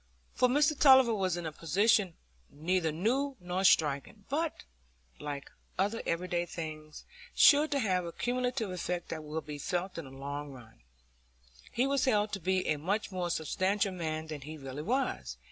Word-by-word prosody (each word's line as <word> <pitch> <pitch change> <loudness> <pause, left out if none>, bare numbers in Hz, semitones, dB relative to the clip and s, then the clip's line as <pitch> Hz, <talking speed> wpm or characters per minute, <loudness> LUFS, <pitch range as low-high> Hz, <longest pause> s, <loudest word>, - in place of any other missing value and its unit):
For 250 - +3
Mr 290 +3 +3
Tulliver 265 -4 +7
was 185 -4 0
in 175 - -5
a 160 - -3
position 190 +4 +2 0.3
neither 165 +2 0
new 255 - 0
nor 180 +1 -2
striking, 160 +3 +2
but, 310 +3 -2 0.6
like 145 -2 -6 0.3
other 205 +4 0
everyday 175 0 -1
things, 155 -2 -7 0.3
sure 295 +1 +7
to 285 - -1
have 185 -8 +1
a 170 - -5
cumulative 245 -1 -1
effect 180 -1 -3
that 155 -1 -5
will 155 +1 -4
be 150 -2 -7
felt 180 +1 -2
in 165 - -7
the - - -10
long 140 +2 -6
run: 120 - -14 0.9
he 245 - +1
was 275 -1 +1
held 210 -4 +2
to 195 - -3
be 185 +1 0
a 155 - +1
much 200 +8 -1
more 180 -2 -2
substantial 190 +5 0
man 160 -3 -3
than 155 -2 -7
he 155 +3 -8
really 135 0 -6
was. 255 - -2
180 Hz, 170 wpm, -31 LUFS, 155-220 Hz, 0.9 s, Tulliver